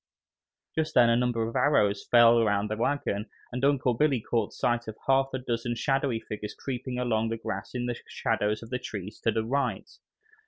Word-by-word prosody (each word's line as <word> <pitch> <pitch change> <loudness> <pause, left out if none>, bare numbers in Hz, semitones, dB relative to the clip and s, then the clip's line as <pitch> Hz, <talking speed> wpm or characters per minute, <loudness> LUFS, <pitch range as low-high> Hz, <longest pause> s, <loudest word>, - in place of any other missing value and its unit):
Just 160 -1 -2
then, 120 -2 +6
a - - +4
number 120 -2 +1
of 115 - -7
arrows 105 -9 +2
fell 120 -1 +7
around 105 -1 +1
the - - 0
wagon, 110 -4 -1 0.2
and 125 +1 -4
Uncle 135 -3 +3
Billy 135 +1 +2
caught 115 -1 -1
sight 120 -1 -1
of 110 - -7
half 135 0 +4
a 130 - -2
dozen 120 -1 -2
shadowy 135 -2 0
figures 105 -1 -7
creeping 130 -1 -5
along 115 -3 0
the 115 - -2
grass 100 0 -5
in 120 -1 -1
the 120 -1 -2
shadows 105 +2 -1
of 115 - -12
the 125 - -1
trees 100 -3 -7
to - - 0
the 110 0 -1
right. 140 +4 -2
120 Hz, 195 wpm, -28 LUFS, 110-125 Hz, 0.2 s, fell